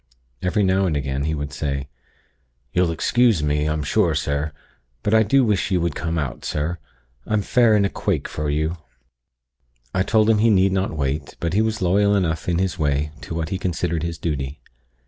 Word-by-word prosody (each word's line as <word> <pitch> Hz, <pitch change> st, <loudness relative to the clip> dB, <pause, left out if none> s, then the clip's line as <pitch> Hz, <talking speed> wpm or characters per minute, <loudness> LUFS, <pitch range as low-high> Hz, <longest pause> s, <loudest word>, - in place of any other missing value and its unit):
Every 95 Hz, +3 st, +1 dB
now 95 Hz, 0 st, +2 dB
and 75 Hz, -4 st, 0 dB
again, 70 Hz, 0 st, -2 dB
he 80 Hz, 0 st, 0 dB
would 75 Hz, 0 st, -5 dB
say: 70 Hz, -3 st, -3 dB, 0.9 s
'You'll 90 Hz, -1 st, +2 dB
excuse 110 Hz, +2 st, +2 dB
me, 75 Hz, 0 st, +1 dB
I'm 75 Hz, -1 st, -1 dB
sure, 70 Hz, -, +2 dB
sir; 70 Hz, +2 st, -1 dB, 0.5 s
but 105 Hz, -, +1 dB
I 110 Hz, -, +6 dB
do 130 Hz, +5 st, +3 dB
wish 105 Hz, -2 st, +1 dB
you 95 Hz, -2 st, +2 dB
would 85 Hz, -2 st, 0 dB
come 85 Hz, +2 st, -3 dB
out, 70 Hz, -6 st, -3 dB
sir. 80 Hz, +4 st, -2 dB, 0.5 s
I'm 110 Hz, -2 st, +1 dB
fair 120 Hz, -1 st, +4 dB
in 100 Hz, -1 st, +3 dB
a -, -, +1 dB
quake -, -, -1 dB
for 75 Hz, -1 st, -3 dB
you.' 80 Hz, +3 st, -1 dB, 1.2 s
"I 95 Hz, -, +1 dB
told 110 Hz, +3 st, +3 dB
him 110 Hz, -2 st, +4 dB
he 115 Hz, +2 st, +4 dB
need 95 Hz, -2 st, +4 dB
not 95 Hz, -4 st, -1 dB
wait; 70 Hz, +1 st, -2 dB
but 85 Hz, 0 st, -2 dB
he 105 Hz, -, +3 dB
was 110 Hz, -2 st, -1 dB
loyal 100 Hz, +3 st, +3 dB
enough 85 Hz, -4 st, 0 dB
in 85 Hz, -, +1 dB
his 95 Hz, -1 st, -1 dB
way 75 Hz, 0 st, 0 dB
to 80 Hz, -, -6 dB
what 80 Hz, -1 st, -2 dB
he 95 Hz, -, -2 dB
considered 85 Hz, -3 st, -1 dB
his 85 Hz, 0 st, -3 dB
duty. 70 Hz, -3 st, -3 dB
85 Hz, 200 wpm, -22 LUFS, 75-100 Hz, 1.2 s, I